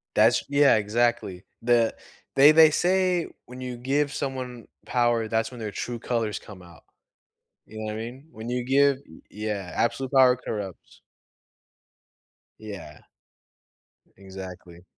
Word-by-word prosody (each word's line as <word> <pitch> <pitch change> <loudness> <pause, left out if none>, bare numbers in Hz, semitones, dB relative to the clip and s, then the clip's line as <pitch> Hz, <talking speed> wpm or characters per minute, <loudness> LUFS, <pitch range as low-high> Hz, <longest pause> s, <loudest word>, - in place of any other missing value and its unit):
That's 110 +3 +4
yeah, 140 -2 +5
exactly. 110 -3 0 0.2
The 120 -1 +3 0.4
they 140 +3 +8
they 160 0 +8
say 180 0 +2 0.2
when 125 +1 -10
you 125 -1 -5
give 140 +4 0
someone 130 -3 -5 0.2
power, 120 -2 +1
that's 115 +1 -1
when 125 - -10
their 110 -2 -4
true 120 +4 -5
colors 115 -3 -2
come 100 -3 -13
out. 85 -2 -16 0.8
You 110 - -11
know 110 - -4
what 105 - -3
I - - -5
mean? 125 +7 -8
When 110 +1 -8
you 125 0 -2
give 140 +1 +3 0.3
yeah, 105 -3 -4
absolute 130 +3 -1
power 130 -2 +6
corrupts. 105 -6 -7 1.6
Yeah. 100 -9 -9 1.2
Exactly. 95 -2 -10
120 Hz, 130 wpm, -25 LUFS, 105-130 Hz, 1.6 s, they